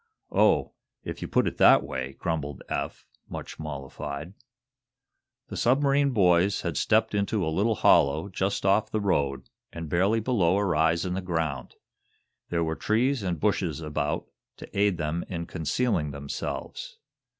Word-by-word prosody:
"Oh, - - +3 0.3
if - - -6
you - - -3
put - - +2
it - - -3
that - - +7
way!" 65 0 -4
grumbled 75 -5 -3
Eph, - - -4 0.2
much - - -7
mollified. 70 +2 -6 1.2
The - - -6
submarine 140 +2 +3
boys 95 -4 +3
had 85 -3 -3
stepped 110 +7 +2
into 100 -1 0
a 80 - -1
little 110 +6 +2
hollow, 75 +1 +4
just 95 +1 -2
off 100 +2 +3
the 110 - -1
road, 70 -9 0 0.2
and 85 -2 -7
barely 100 +6 +3
below 100 -6 +2
a 100 - +1
rise 80 0 +2
in 90 - -2
the 95 - -2
ground. 80 -7 -3 0.7
There 85 -1 0
were 80 0 -1
trees 120 +7 +1
and 90 -5 -2
bushes - - 0
about 75 -1 -2 0.3
to - - -12
aid 100 -2 +2
them 80 +1 -2
in 85 -2 -4
concealing 80 +1 -1
themselves. 445 - -6
85 Hz, 150 wpm, -27 LUFS, 75-105 Hz, 1.2 s, that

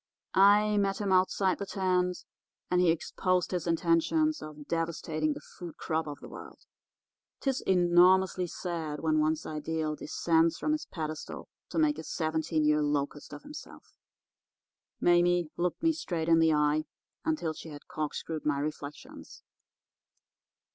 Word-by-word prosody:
I 205 +2 +5
met 195 -1 +1
him 200 -2 -1
outside 185 0 +2
the 200 - -4
tent, 180 -2 0 0.5
and 180 0 +4
he 180 - +4
exposed 180 +2 0
his 175 -2 -2
intentions 175 - +2
of 150 -1 -9
devastating 160 -2 -1
the - - -8 0.2
food 175 -3 -8
crop 160 0 -2
of 145 -1 -7
the - - -9
world. - - -11 0.7
'Tis 270 -2 -1
enormously 180 0 +4
sad 165 -4 -4
when 155 -1 +2
one's 155 +1 0
ideal 155 0 -2
descends 165 +1 +1
from 305 - -1
his 305 0 -2
pedestal 155 -2 -6 0.2
to - - -5
make 310 -2 +2
a - - -6
seventeen 160 -1 -1
year 150 0 +3
locust 145 0 -2
of 145 - -9
himself.' 300 +1 -11 1.1
"Mame 175 -2 +3
looked 175 - -2
me 325 0 +4
straight 170 - -3
in 165 0 +6
the 160 -1 +4
eye 150 0 +2 0.4
until 310 - -1
she 160 - -10
had 145 -1 -11
corkscrewed 155 +1 -4
my 145 -2 +1
reflections. 150 0 -7
165 Hz, 145 wpm, -30 LUFS, 155-185 Hz, 1.1 s, in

